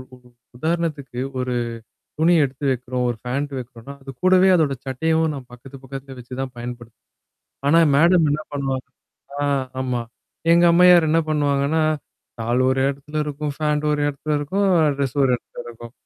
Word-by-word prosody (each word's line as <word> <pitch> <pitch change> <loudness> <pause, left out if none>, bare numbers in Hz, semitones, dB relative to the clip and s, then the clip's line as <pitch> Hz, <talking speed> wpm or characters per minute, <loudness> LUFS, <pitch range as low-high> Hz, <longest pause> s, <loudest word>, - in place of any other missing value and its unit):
உ - - -17 0.4
உதாரணத்துக்கு, 155 -4 -2 0.2
ஒரு 125 0 -2 0.7
துணி 165 +3 +4
எடுத்து 135 +1 -5
வைக்கிறோம். 125 0 -3
ஒரு 120 - -2
ஃபேண்ட் 140 +4 -3
வைக்கிறோம்னா, 125 +1 -9
அது 135 - -8
கூடவே, 185 0 +5
அதோட 150 -5 +1
சட்டையவும் 160 +4 0
நான் 130 -3 -9
பக்கத்து, 135 +2 -12
பக்கத்துல 135 0 -8
வச்சு 125 +1 -7
தான் 130 -1 -6
பயன்படுத்துவன். 120 -1 -9 0.6
ஆனா, 165 +3 +5 0.2
மேடம் 170 +1 +5
என்ன 150 - -1
பண்ணுவாங்க 135 -2 -2 0.6
ஆ! - - +1 0.4
ஆமா. 125 -2 -1 0.5
எங்க 170 +1 +5
அம்மையார் 175 -1 +6
என்ன 160 +2 +3
பண்ணுவாங்கன்னா? 145 +1 +1 0.6
ஷால் 120 +3 0
ஒரு 130 - +1
எடத்துல 140 +2 -5
இருக்கும். 150 0 -4
ஃபாண்ட் 150 -1 0
ஒரு 150 - -1
எடத்துல 145 +2 -3
இருக்கும். 190 +8 0 0.3
ட்ரெஸ் 140 -1 -2
ஒரு 135 - +3
எடத்துல - - -11
இருக்கும். 120 0 -10
140 Hz, 155 wpm, -21 LUFS, 125-155 Hz, 0.7 s, அம்மையார்